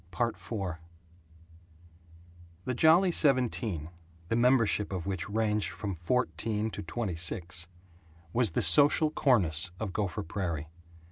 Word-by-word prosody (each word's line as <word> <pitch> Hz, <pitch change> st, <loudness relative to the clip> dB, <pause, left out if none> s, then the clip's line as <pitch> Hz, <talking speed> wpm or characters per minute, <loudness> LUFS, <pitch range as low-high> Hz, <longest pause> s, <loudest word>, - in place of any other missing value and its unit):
IV 115 Hz, +5 st, -3 dB, 2.1 s
The 125 Hz, -, -2 dB
Jolly 165 Hz, +8 st, +4 dB
Seventeen 120 Hz, -, +1 dB, 0.4 s
(the -, -, +1 dB
membership 120 Hz, -4 st, +2 dB
of 90 Hz, -3 st, -4 dB
which 95 Hz, 0 st, -4 dB
ranged 105 Hz, 0 st, 0 dB
from 100 Hz, -2 st, -5 dB
fourteen 105 Hz, +3 st, -2 dB
to 105 Hz, -, -6 dB
twenty 105 Hz, -5 st, -4 dB
six) 85 Hz, 0 st, -2 dB, 0.7 s
was 115 Hz, -7 st, +2 dB
the -, -, +1 dB
social 150 Hz, +1 st, +6 dB
cornice 95 Hz, -, +2 dB
of 105 Hz, -4 st, -4 dB
Gopher 100 Hz, -5 st, -3 dB
Prairie. 80 Hz, -4 st, -4 dB
105 Hz, 115 wpm, -29 LUFS, 85-120 Hz, 2.1 s, social